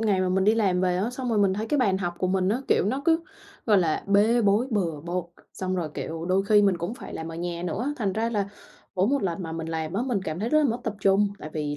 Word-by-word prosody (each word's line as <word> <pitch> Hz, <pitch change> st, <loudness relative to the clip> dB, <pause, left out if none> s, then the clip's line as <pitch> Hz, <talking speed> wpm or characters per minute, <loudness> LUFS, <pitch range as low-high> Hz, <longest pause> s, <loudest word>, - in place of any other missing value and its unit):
ngày 205 Hz, -4 st, +2 dB
mà 185 Hz, -, +1 dB
mình 190 Hz, +1 st, +2 dB
đi 215 Hz, -, +5 dB
làm 195 Hz, -5 st, +2 dB
về 180 Hz, -1 st, +1 dB
á, 200 Hz, +6 st, -1 dB
xong 250 Hz, 0 st, -4 dB
rồi 225 Hz, -, +1 dB
mình 195 Hz, -2 st, +3 dB
thấy 215 Hz, +3 st, -3 dB
cái 290 Hz, +5 st, 0 dB
bàn 195 Hz, -6 st, +2 dB
học 175 Hz, -2 st, -3 dB
của 185 Hz, -, 0 dB
mình 185 Hz, 0 st, +1 dB
á, 230 Hz, +6 st, +1 dB
kiểu, -, -, +3 dB
nó 265 Hz, +6 st, -1 dB
cứ, 330 Hz, -1 st, +3 dB, 0.5 s
gọi 210 Hz, -3 st, +5 dB
là, 165 Hz, -4 st, 0 dB
bê 210 Hz, +4 st, +4 dB
bối 205 Hz, +5 st, +3 dB
bừa 170 Hz, -9 st, -1 dB
bộn, 175 Hz, +2 st, -3 dB, 0.3 s
xong 185 Hz, 0 st, -3 dB
rồi, 170 Hz, -3 st, -2 dB
kiểu, 165 Hz, 0 st, -5 dB
đôi 185 Hz, +2 st, +2 dB
khi 210 Hz, -1 st, +6 dB
mình 195 Hz, -3 st, +3 dB
cũng 175 Hz, +7 st, -3 dB
phải 260 Hz, -, -9 dB
làm 160 Hz, -, -5 dB
ở 165 Hz, -, -7 dB
nhà 170 Hz, 0 st, -4 dB
nữa, 225 Hz, -, -2 dB
thành 205 Hz, -7 st, -1 dB
ra 225 Hz, +3 st, -1 dB
là 205 Hz, -3 st, -1 dB, 0.5 s
mỗi 185 Hz, +1 st, +2 dB
một 280 Hz, 0 st, +1 dB
lần 180 Hz, -1 st, -2 dB
mà 165 Hz, -, -5 dB
mình 165 Hz, 0 st, -4 dB
làm 160 Hz, 0 st, -3 dB
á 200 Hz, -, 0 dB
mình 225 Hz, -7 st, -1 dB
cảm 155 Hz, -2 st, -4 dB
thấy 220 Hz, -, -1 dB
rất 305 Hz, -, +4 dB
là 305 Hz, -, +3 dB
mất 240 Hz, -3 st, +1 dB
tập 225 Hz, -, -2 dB
trung. 200 Hz, +1 st, +4 dB
Tại 155 Hz, -, -8 dB
vì 150 Hz, -2 st, -3 dB
195 Hz, 295 wpm, -26 LUFS, 175-220 Hz, 0.5 s, khi